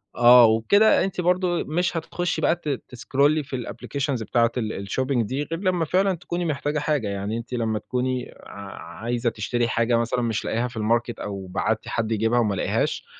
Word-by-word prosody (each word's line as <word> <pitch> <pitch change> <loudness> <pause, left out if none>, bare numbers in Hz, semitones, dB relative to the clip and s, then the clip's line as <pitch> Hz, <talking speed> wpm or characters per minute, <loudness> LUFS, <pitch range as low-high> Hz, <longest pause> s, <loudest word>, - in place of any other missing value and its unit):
آه، 120 0 +8
وبكده 115 - +4
أنتِ 190 -1 -2
برضه 180 0 +1
ت - - -14
مش 170 +2 0
هتتخشّي 175 +2 -2
بقى 165 - +3
ت 155 -3 -6 0.2
تسكرولي 140 +5 +1
في 130 - -6
الأبلكيشنز 130 0 -3
بتاعة 115 +1 +2
ال 110 -2 -2
الشوبينج 125 +5 -1
دي 135 +3 -2
غير 165 +2 -5
لمّا 180 -4 +1
فعلًا 190 +4 +2
تكوني 175 +1 -4
محتاجة 150 0 -1
حاجة. 145 -7 0
يعني 100 +3 -3
أنتِ 115 +2 -8
لمّا 110 -3 -1
تكوني 125 +1 -3
ع 100 -4 -10
عايزة 120 0 0
تشتري 115 +2 -1
حاجة 115 +1 +1
مثلًا 115 +1 0
مش 115 -2 -1
لاقياها 120 +2 0
في 120 -1 -10
الماركت 115 +2 0
أو 100 -2 -5
بعتّي 90 - -2
حد 115 -1 -2
يجيبها 115 +2 +2
وما 105 -4 +1
لقيهاش، - - -1
125 Hz, 185 wpm, -24 LUFS, 115-155 Hz, 0.2 s, آه